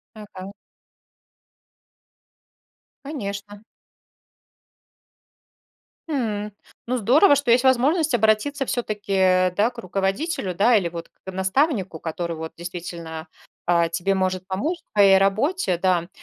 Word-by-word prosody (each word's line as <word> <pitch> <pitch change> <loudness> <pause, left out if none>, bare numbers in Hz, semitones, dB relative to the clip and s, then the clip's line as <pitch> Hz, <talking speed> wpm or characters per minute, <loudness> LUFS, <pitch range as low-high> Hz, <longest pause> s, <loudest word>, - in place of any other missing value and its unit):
Ага. 200 -3 -10 2.6
Конечно. 205 -7 -6 2.5
М. 215 -8 -2 0.3
Ну, 255 +1 0
здорово, 275 - +5
что 280 -3 0
есть 245 +2 +4
возможность 275 +4 +3
обратиться 235 +6 +2
всё-таки, 215 -5 -3
э, 185 -1 +3
да, 210 +4 +3
к 245 - -22
руководителю, 195 - -2
да, 220 +7 +4
или 185 -5 +1
вот 170 0 -8
к - - -67
к - - -4
наставнику, 190 - 0
который 170 +1 -4
вот 160 0 -6
действительно, 170 -2 -7 0.4
а, 170 -1 +3
тебе 175 +4 0
может 185 -1 -1
помочь 270 - -2
в - - -34
твоей 195 -2 +6
работе, 205 - +1
да. 175 -1 +1
200 Hz, 115 wpm, -23 LUFS, 185-245 Hz, 2.6 s, твоей